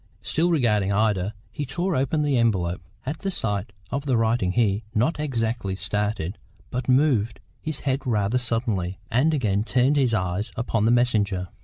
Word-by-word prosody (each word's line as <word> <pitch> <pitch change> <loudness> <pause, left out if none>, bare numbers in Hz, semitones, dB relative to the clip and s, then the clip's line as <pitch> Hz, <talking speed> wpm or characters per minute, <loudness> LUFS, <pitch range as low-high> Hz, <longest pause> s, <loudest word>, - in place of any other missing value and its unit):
Still 170 +3 +1
regarding 105 - +2
Ida, 105 -1 +1 0.2
he 145 - -4
tore 175 +7 -1
open 140 +4 +1
the 145 -2 +1
envelope. 95 -7 +1 0.2
At 145 +4 -3
the 195 - -2
sight 105 - -2 0.2
of 140 +3 -3
the 130 -3 +3
writing 110 -5 +1
he, 105 -2 +2
not 135 +10 +1
exactly 115 -8 -1
started, 105 -2 -2 0.3
but 125 +1 -3
moved 125 -5 +3 0.2
his 155 -3 -4
head 135 0 0
rather 110 +1 +1
suddenly, 110 -7 -1
and 130 +8 +3
again 105 -9 +1
turned 130 +5 +2
his 125 -5 +3
eyes 90 +1 -1
upon 115 -2 0
the 115 - +4
messenger. 105 -7 +2
115 Hz, 165 wpm, -24 LUFS, 100-135 Hz, 0.3 s, the